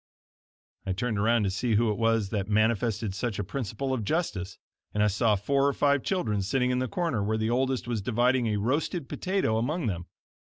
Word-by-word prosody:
I 95 - -2
turned 110 +2 -1
around 115 +2 +3
to 95 - 0
see 115 +4 0
who 110 0 +3
it 105 - -3
was 115 -3 +2
that 100 -2 -2
manifested 110 -1 +1
such 100 +2 -3
a 105 - -1
principle 125 +4 -3
of 120 -4 -1
justice, 100 - -2 0.4
and 105 - +3
I - - +5
saw 105 +1 +2
four 140 +8 +1
or 140 - +1
five 140 -1 +2
children 110 - -1
sitting 125 +6 +1
in 125 - +1
the 130 - -1
corner, 160 - -1
where 110 +2 0
the 110 +1 0
oldest 130 0 0
was 115 -4 -1
dividing 120 +3 +2
a 105 -1 0
roasted 140 - -1
potato 185 - 0
among 150 +7 -1
them. 90 -5 -3
115 Hz, 205 wpm, -28 LUFS, 105-130 Hz, 0.4 s, I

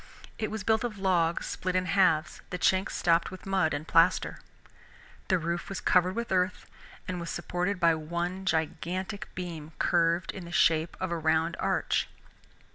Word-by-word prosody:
It 215 - -1
was 220 -2 -4
built 220 +2 +2
of 230 -4 -3
logs 175 -4 +1
split 185 0 -3
in 185 0 +2
halves, 180 -4 +2
the 180 - -3
chinks 190 +2 +2
stopped 170 0 +2
with 185 - -10
mud 190 -5 +1
and 145 +2 -3
plaster. 165 +2 +3 0.9
The 185 - +3
roof 170 +2 -3
was 195 - -4
covered 180 +1 +3
with 235 -2 -3
earth 185 -1 0 0.4
and 180 -1 -3
was 170 - -5
supported 180 +2 -2
by 170 -1 +5
one 170 +4 -3
gigantic 185 +4 -2
beam 165 -4 -6
curved 170 +1 +2
in 190 -3 -8
the 170 - -9
shape 165 -1 +2
of 185 -2 -2
a 170 - 0
round 160 +1 +1
arch. - - 0
180 Hz, 170 wpm, -29 LUFS, 165-190 Hz, 0.9 s, by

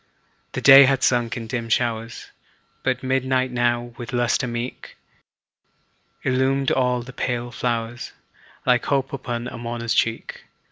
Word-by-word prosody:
The - - -3
day 135 0 +9
had 135 0 +1
sunk 120 -2 +1
in 115 - -5
dim 115 -1 -4
showers, 115 -1 -2 0.5
But 130 -1 -1
midnight 130 0 0
now, 120 -1 0
with 120 0 -7
lustre 120 +2 +1
meet. 120 +1 -6 1.3
Illumined 135 +1 +1
all 125 -2 +1
the 130 +2 -11
pale 120 -1 -3
flowers, 120 -1 -3 0.5
Like 125 -2 +3
hope 135 -1 0
upon 120 -3 -4
a 125 - -8
mourner's 115 -1 -3
cheek. 115 0 -1
120 Hz, 135 wpm, -22 LUFS, 120-130 Hz, 1.3 s, day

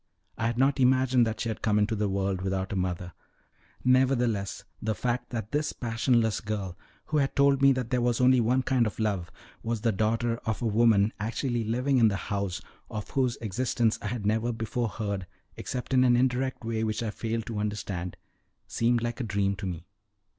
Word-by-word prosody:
I 115 - -1
had 115 0 -2
not 135 +2 +3
imagined 130 -1 +4
that 110 - -3
she 115 - -1
had 110 - -4
come 105 -1 +2
into 105 +2 +2
the 105 -1 0
world 95 -1 -1
without 95 +1 -2
a - - -2
mother; 90 -1 -2 0.7
nevertheless, 125 -5 +2 0.2
the 110 0 -1
fact 120 +4 -2
that 110 -3 -5
this 150 +1 0
passionless 115 -1 +1
girl, 100 -4 -4 0.3
who 155 - -1
had 140 -2 +1
told 140 -1 +4
me 140 0 +7
that 125 -2 -3
there 125 -1 +2
was 120 -1 +1
only 125 0 +5
one 125 +3 +2
kind 125 -3 +2
of 105 - -6
love, 100 -5 -1 0.3
was 115 -1 -2
the 115 - +2
daughter 115 +3 0
of 110 -3 -3
a - - -3
woman 110 -1 +4
actually 115 +2 -1
living 125 +5 +1
in 115 - +6
the 100 - +1 0.2
house, 100 -3 -2 0.3
of 105 -1 -6
whose 130 -3 +1
existence 115 +1 0
I - - -4
had 110 -1 -3
never 110 +3 +1
before 115 +1 -2
heard, 100 -4 -4 0.3
except 125 +1 -5
in 130 -1 +5
an 120 -1 +5
indirect 130 0 0
way 110 -1 -1
which 110 +1 -1
I 110 - -2
failed 115 +2 -3
to 110 -3 -4
understand, 100 -4 -3 0.5
seemed 120 0 +1
like 120 +1 -3
a - - -1
dream 100 -2 0
to 100 - -4
me. 85 -1 -5
115 Hz, 200 wpm, -28 LUFS, 105-125 Hz, 0.7 s, me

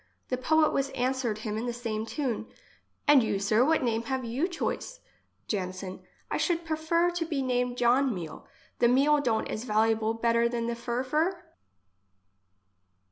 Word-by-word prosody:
The 255 - +1
poet 310 +4 +3
was 275 0 0
answered 250 -3 0
him 215 0 -2
in 240 - -3
the 240 - -2
same 225 -2 -3
tune: 245 -5 -2 0.2
— - - -31
" - - -45
And 290 -2 +7
you, 220 -3 0
sir, 215 +4 +3
what 315 +1 +2
name 230 -2 +1
have 265 -2 -2
you 255 +9 0
choice? 390 +7 -4 0.5
Janson: 185 -2 -4 0.3
I - - +1
should 340 -2 0
prefer 325 +2 +1
to 350 -1 -2
be 300 -5 -2
named 250 -1 0
John 250 +3 +3
Meal. 175 -7 -7 0.3
The 240 - +5
meal 280 +4 +4
don't 225 -5 0
is 215 - -4
valuable 220 -1 +1
better 235 +1 +2
than 235 -1 -2
the 235 - -1
furfur?" 255 +9 0
245 Hz, 170 wpm, -28 LUFS, 225-290 Hz, 0.5 s, And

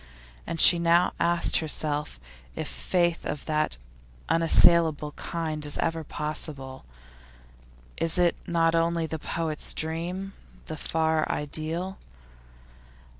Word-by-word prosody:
And 165 - -4 0.2
now 170 +1 +3
she - - -21
asked 170 0 +2
herself 150 - -2 0.4
if - - -4
faith 175 -2 -1
of 145 - -5
that 155 - -1 0.5
unassailable 165 -2 +4
kind 155 -1 -5
is 145 -1 -2
ever 165 -1 -2
possible; 145 -3 -6 1.1
is 165 +1 0
it 175 -1 +2
not 165 -1 +1
only 165 0 0
the 160 0 -5
poet's 160 -1 -1
dream, 175 +5 -4 0.3
the 155 - -6
far 160 0 -1
ideal? 160 +6 -3
165 Hz, 110 wpm, -26 LUFS, 155-170 Hz, 1.1 s, unassailable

